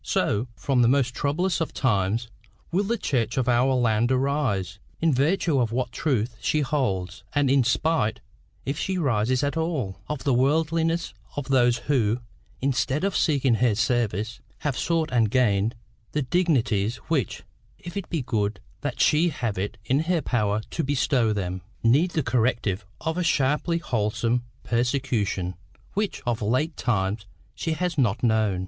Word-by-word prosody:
So, 110 +5 0
from 135 -3 +1
the 120 - +5
most 125 -1 +2
troublous 170 +7 0
of 165 - -3
times, 110 -1 +1 0.4
will 195 +4 +1
the 235 +4 0
Church 120 - -1
of 130 -2 +1
our 125 +2 +3
land 120 -1 +2
arise, 130 - 0 0.2
in 165 -2 +3
virtue 150 +2 +2
of 115 -3 +1
what 125 0 -1
truth 125 -7 -1
she 155 - +1
holds, 115 -11 -1
and 145 -2 +3
in 135 -1 +4
spite, 125 -1 +1 0.5
if 140 +3 -2
she 190 -1 -1
rises 125 -4 +1
at 145 +2 -1
all, 155 - -2
of 150 -3 -3
the 140 - +2
worldliness 160 +5 +1 0.2
of 145 -1 -4
those 120 -3 +4
who, 120 -6 +2 0.4
instead 135 +3 0
of 195 -1 0
seeking 140 -5 +2
her 115 -1 +2
service, 110 -1 0 0.2
have 145 -4 -1
sought 165 0 0
and 115 -3 +3
gained 110 -3 +2 0.4
the 150 - 0
dignities 125 - +1
which, 140 - -1 0.3
if 175 - -9
it 200 -2 -4
be 165 -6 -1
good 105 -4 -1 0.2
that 145 - -3
she 160 +3 +4
have 120 - -3
it 100 +2 -3
in 135 +4 +2
her 165 -1 0
power 105 -4 0
to 165 - -1
bestow 130 -4 +2
them, 95 -3 -2 0.2
need 140 +10 +4
the 160 -3 -1
corrective 110 -6 0
of 160 +2 -1
a - - +1
sharply 150 +2 +1
wholesome 115 -3 0 0.2
persecution 120 -7 0 0.4
which 205 +1 -2
of 120 -2 -1
late 130 +10 0
times 100 -2 -1 0.3
she 160 - -2
has 165 -1 -1
not 120 -2 +1
known. 110 -5 +2
130 Hz, 160 wpm, -25 LUFS, 110-150 Hz, 0.5 s, the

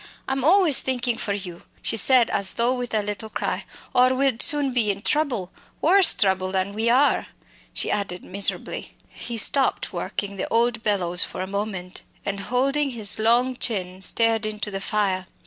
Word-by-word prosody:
I'm 265 -1 -1
always 340 -2 +5
thinkin' 245 -2 -2
for 205 - -2
you!" 180 -4 -6 0.2
she - - -1
said 245 +1 +4
as 195 -1 -1
though 235 +2 +2
with 245 -1 -5
a 210 - +1
little 210 +2 -5
cry, - - -3 0.3
"or 255 +1 +4
we'd 265 -3 +1
soon 285 -3 +3
be 230 -4 +1
in 200 +1 -3
trouble 265 - 0 0.3
worse 375 +3 +4
trouble 190 -2 +1
than 190 +1 -2
we 220 +2 0
are!" 265 +4 +3 0.4
she - - -2
added 195 -3 -3
miserably. 195 +1 -2
He 235 - -8
stopped 265 +5 +3
working 200 -1 -4
the - - -3
old 235 0 +1
bellows 180 -5 0
for 185 - -5
a - - -4
moment, 195 -2 -5 0.2
and, 200 -1 -3
holding 275 +7 0
his 220 -5 0
long 240 +3 +2
chin, 185 -6 -2
stared 225 +3 +1
into 215 -1 -4
the 195 0 -5
flames. 195 -3 -1
220 Hz, 175 wpm, -23 LUFS, 195-255 Hz, 0.4 s, always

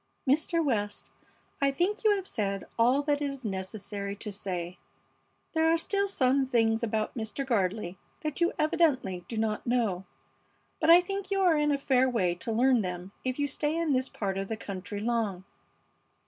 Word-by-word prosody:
"Mr. 315 +4 +2
West, 205 -6 -1 0.5
I 280 - +4
think 355 +11 -1
you 425 -2 +5
have 385 -2 -4
said 200 - -2 0.2
all 250 +5 +4
that 290 0 +1
it 285 - 0
is 275 -3 -8
necessary 200 +1 -4
to 210 +1 -6
say. 180 -3 -4 0.7
There 320 0 +3
are 330 - +4
still 400 +4 0
some 270 -6 +2
things 225 -2 +2
about 220 -2 -1
Mr. 225 +4 -3
Gardley 195 -5 0 0.2
that 305 +1 -4
you 345 - +4
evidently 270 - +1
do 230 - -5
not 220 +1 -1
know, 220 -7 0 0.7
but 315 - +2
I 345 +2 +9
think 390 +1 -4
you 395 -1 +1
are 355 -4 +5
in 295 0 +2
a 285 - +2
fair 260 -2 +3
way 190 -8 +1
to 225 +7 -5
learn 245 +1 +4
them 180 0 -5
if 255 -1 -2
you 290 - +1
stay 295 +2 -1
in 330 -3 +1
this 260 0 +1
part 195 -2 -3
of 195 - -3
the 220 - -3
country 200 -1 -5
long. 220 -5 -1
245 Hz, 185 wpm, -29 LUFS, 205-295 Hz, 0.7 s, I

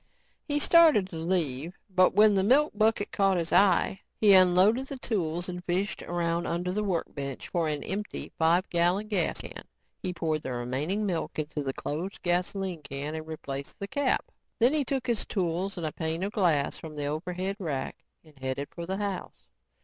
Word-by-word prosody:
He 290 -1 +1
started 305 - +6
to 170 - -8
leave 165 -2 -1
but 185 -2 +3
when 210 0 +7
the 195 - +3
milk 270 +9 +4
bucket 215 0 +1
caught 195 -2 +2
his 170 -1 -2
eye, 195 0 +4 0.2
he 210 -2 +6
unloaded 190 +7 +5
the 275 - -6
tools 175 -8 -2
and 180 -1 -6
fished 190 +3 -1
around 170 0 -1
under 175 +2 -1
the 210 +2 -1
workbench 145 -8 -3
for 170 -2 0
an 150 -1 -2
empty 205 +2 -4
five 170 +3 +3
gallon 180 +5 +1
gasoline 185 -7 -1
can. - - -9 0.4
He 185 - -2
poured 155 -3 -1
the 130 - -4
remaining 135 - -2
milk 175 -5 -2
into 150 -1 -3
the 135 -1 -3
closed 170 +10 -4
gasoline 180 0 -1
can 140 +1 -5
and 160 0 -6
replaced 140 -3 -6
the 200 - -5
cap. 280 +5 0 0.3
Then 240 +5 +4
he 305 -2 +3
took 265 -1 -2
his 235 -4 0
tools 185 0 -2
and 170 - -3
a 155 - -2
pane 160 +2 -2
of 200 - -2
glass 165 -9 +1
from 155 -2 -9
an 145 - -2
overhead 180 +6 -3
rack 150 -8 -3 0.3
and 155 -4 -20
headed 130 +2 -3
for 170 -1 -6
the 190 +1 -2
house. 200 - -4
180 Hz, 190 wpm, -28 LUFS, 160-200 Hz, 0.4 s, when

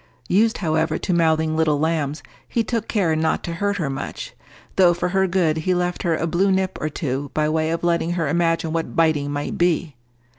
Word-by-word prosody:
Used, 220 +4 +3
however, 160 -2 0
to 185 - -2
mouthing 160 -2 +2
little 155 -2 +2
lambs, 150 -2 -1 0.3
he 230 - +1
took 230 0 -2
care 180 -7 +1
not 160 0 0
to 170 - -4
hurt 200 +4 -1
her 165 -6 -1
much, 135 0 -5 0.4
though 175 -2 +5
for 175 - -1
her 190 +1 +2
good 175 -4 +1
he 180 +3 0
left 180 0 -1
her 170 -3 +1
a 160 - -1
blue 180 +4 +1
nip 190 0 0
or 155 - -1
two 140 -2 -3
by 155 0 +2
way 155 +1 0
of 165 +1 -2
letting 170 0 +1
her 165 -3 -1
imagine 165 0 0
what 165 -1 -3
biting 155 -3 +2
might 145 0 -3
be. 170 -3 +1
165 Hz, 210 wpm, -22 LUFS, 155-180 Hz, 0.4 s, though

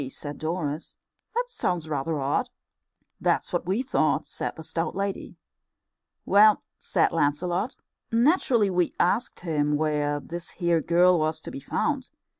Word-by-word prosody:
said 145 +2 -7
Doris, 155 -1 -3 0.4
"that 485 - +2
sounds 180 - -2
rather 155 +1 -1
odd." 140 +1 0 0.7
"That's - - 0
what 175 0 -1
we 200 +7 +1
thought," 200 -11 +1
said - - -4
the 160 - -9
stout 165 +2 -2
lady. 195 0 -3 0.9
"Well," 210 +1 +6 0.2
said - - +1
Lancelot, 175 - 0 0.4
"naturally 235 - +3
we 180 -1 +1
asked 225 +8 +1
him 150 -4 +1
where 150 -1 0
this 170 +5 -7
here 170 -2 +2
girl 175 +2 +4
was 155 0 0
to - - -8
be - - -6
found. - - -1
170 Hz, 140 wpm, -26 LUFS, 150-190 Hz, 0.9 s, Well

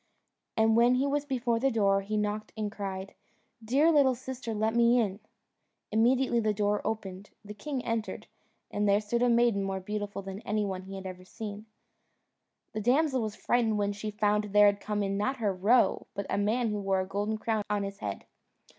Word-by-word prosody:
And 220 0 +4
when 240 +2 +5
he 260 +2 +1
was 285 +1 0
before 245 -4 0
the 270 +3 +2
door 200 -5 +2
he 215 +2 -3
knocked 210 0 -2
and 210 -1 -2
cried, 195 -2 -5 0.5
"Dear 280 +9 +3
little 275 -4 +4
sister, 255 -1 -6
let 220 +1 0
me 235 +1 +4
in." 200 -3 -1 0.7
Immediately 240 +3 +3
the 215 -2 0
door 205 0 +1
opened, 200 -3 -4 0.2
the 210 - -7
king 255 +5 -5
entered, 230 -2 -3 0.5
and 205 0 +1
there 200 +1 +4
stood 215 +3 -2
a 245 - +4
maiden 235 -3 +3
more 195 -1 -2
beautiful 205 +1 -4
than 195 +1 -6
any 215 -1 -1
one 190 -2 -3
he 195 +1 -9
had 190 0 -7
ever 185 -1 -7
seen. 210 +2 -8 1.1
The 215 - -3
damsel 265 +3 +2
was 215 -2 -3
frightened 230 -3 +1
when 205 -1 0
she 215 +1 -5
found 210 0 +1
there 210 0 +5
had 200 0 +3
come 210 -1 -1
in, 195 0 -1
not 260 +7 -1
her 210 -5 0
roe, 210 +7 +3
but 200 -1 -3
a - - +1
man 225 +3 +1
who 210 -1 -2
wore 195 -1 +1
a - - -3
golden 205 +3 -2
crown 220 0 -1
on 205 -1 0
his 200 0 -6
head. 100 -1 -5
210 Hz, 200 wpm, -29 LUFS, 200-235 Hz, 1.1 s, when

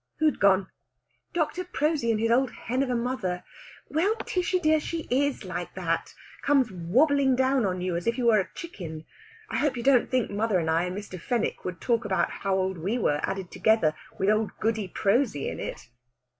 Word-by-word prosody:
"Who'd 310 -1 +2
gone?" 195 -1 +4 0.7
"Dr. 345 +2 -1
Prosy 305 -7 0
and 220 -2 +2
his 230 +1 +1
old 255 +2 +3
hen 250 +4 -3
of 275 - 0
a 250 - +1
mother. 235 -7 -2 0.4
Well, 375 +8 +1
Tishy 365 0 0
dear, 315 -2 +3
she 330 +2 -4
is 280 +2 +1
like - - -5
that. - - -2 0.3
Comes 270 -6 +3
wobbling 265 - +3
down 260 -3 +2
on 180 -1 -2
you 180 -1 -1
as 170 +4 -3
if 230 +1 +1
you 250 - -1
were 225 -2 +5
a 190 - -2
chicken! 165 - -7 0.5
I - - 0
hope 280 -3 +1
you 235 - -4
don't 265 -2 +4
think 255 -4 0
mother 210 -1 +1
and 160 -2 0
I 165 +2 +2
and 180 +2 -4
Mr. 200 -3 -7
Fenwick 240 0 -1
would 180 -2 -4
talk 235 -1 +1
about 195 -3 0
how 195 -1 -1
old 190 -1 -1
we 200 +9 -1
were 150 -10 +1
added 190 -2 -3
together, 185 -4 +3 0.2
with 195 +2 +2
old 215 0 +1
Goody 220 -2 0
Prosy 200 - +1
in - - -4
it!" - - -6
230 Hz, 200 wpm, -27 LUFS, 190-270 Hz, 0.7 s, were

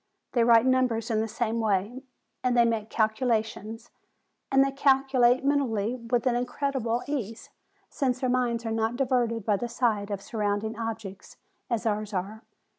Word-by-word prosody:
They 240 - +2
write 230 0 +5
numbers 250 -3 +1
in 220 - +1
the 225 - -1
sa 220 +1 -2
me 230 - -1
way, 215 +4 -1 0.4
and 250 -1 +1
they 235 - +6
make 225 -2 -1
calculations; 220 0 -1 0.6
and 270 0 +5
they 275 - -1
calculate 270 -2 +3
mentally 245 -7 +1
with 235 0 -2
an 250 -2 +2
incredible 245 -1 -1
ease, 235 -7 -5 0.4
since 255 -3 -1
their 260 - 0
minds 245 -2 0
are 225 - -2
not 225 +1 0
diverted 240 -4 0
by 210 -2 +2
the 240 +4 -4
sight 220 -4 0
of 200 -2 -3
surro'unding 210 +1 -2
objects, 220 -4 -6 0.3
as 235 -1 -1
ours 210 -1 -1
are. 200 +4 -4
230 Hz, 165 wpm, -27 LUFS, 220-255 Hz, 0.6 s, they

